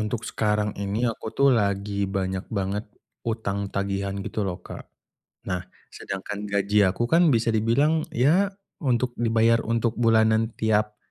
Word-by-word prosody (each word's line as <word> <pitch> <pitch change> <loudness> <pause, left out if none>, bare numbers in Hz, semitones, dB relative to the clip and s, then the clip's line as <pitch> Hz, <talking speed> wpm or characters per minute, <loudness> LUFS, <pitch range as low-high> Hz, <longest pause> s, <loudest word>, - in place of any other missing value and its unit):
untuk 105 +2 -3
sekarang 105 -1 0
ini 100 +4 -1
aku 115 -2 -2
tuh 140 -1 +4
lagi 100 -2 0
banyak 95 -1 -2
banget 100 0 -2 0.4
utang 100 -3 -2
tagihan 100 0 -2
gitu 105 0 -3
loh, 90 -2 -3
Kak. - - -9 0.6
Nah, 90 -1 -1 0.3
sedangkan 100 +2 -5
gaji 100 0 +3
aku 110 +6 -1
kan 170 0 +5
bisa 115 0 +2
dibilang 140 +9 +2
ya 165 +11 +3 0.3
untuk 125 -3 0
dibayar 115 0 +3
untuk 115 0 0
bulanan 110 -1 +3
tiap 105 -1 +1
110 Hz, 140 wpm, -25 LUFS, 100-115 Hz, 0.6 s, kan